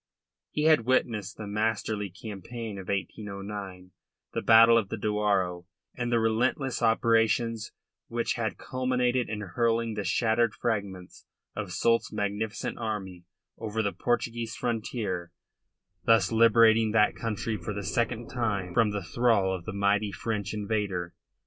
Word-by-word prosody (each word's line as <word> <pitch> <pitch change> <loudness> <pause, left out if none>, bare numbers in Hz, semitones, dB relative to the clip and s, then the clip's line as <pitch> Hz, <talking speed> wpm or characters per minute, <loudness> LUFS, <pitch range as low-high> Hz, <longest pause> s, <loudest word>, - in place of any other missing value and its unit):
He 150 - -2
had 155 -7 +4
witnessed 110 -6 0
the 110 - -6
masterly 105 0 -1
campaign 105 +2 -7
of 95 - -9
1809, 100 -2 -5 0.4
the - - -1
battle 115 +1 +7
of 110 -4 +2
the - - -3
Douro 100 -4 0 0.3
and 120 -1 -2
the 120 - +3
relentless 120 +5 0
operations 115 -1 +2 0.4
which 115 0 -1
had 110 -3 -2
culminated 125 -1 0
in 105 -1 -3
hurling 115 +3 0
the 105 -1 -3
shattered 115 +1 +1
fragments 100 -5 -4 0.3
of - - -4
Soult's 115 0 +1
magnificent 105 +1 -3
army 95 -6 -4 0.3
over 110 0 -2
the 100 - -1
Portuguese 115 -1 -1
frontier, 105 -7 -3 0.7
thus 115 +4 +4
liberating 115 -1 +5
that 105 -1 +4
country 115 0 -3
for 100 +1 -5
the 100 0 -4
second 120 +2 -1
time 100 -7 -2
from 115 +1 +4
the 105 -2 -3
thrall 100 0 +2
of 85 -2 -8
the - - -4
mighty 100 +1 +1
French 105 +1 -3
invader. 100 -4 -2
110 Hz, 135 wpm, -28 LUFS, 100-115 Hz, 0.7 s, battle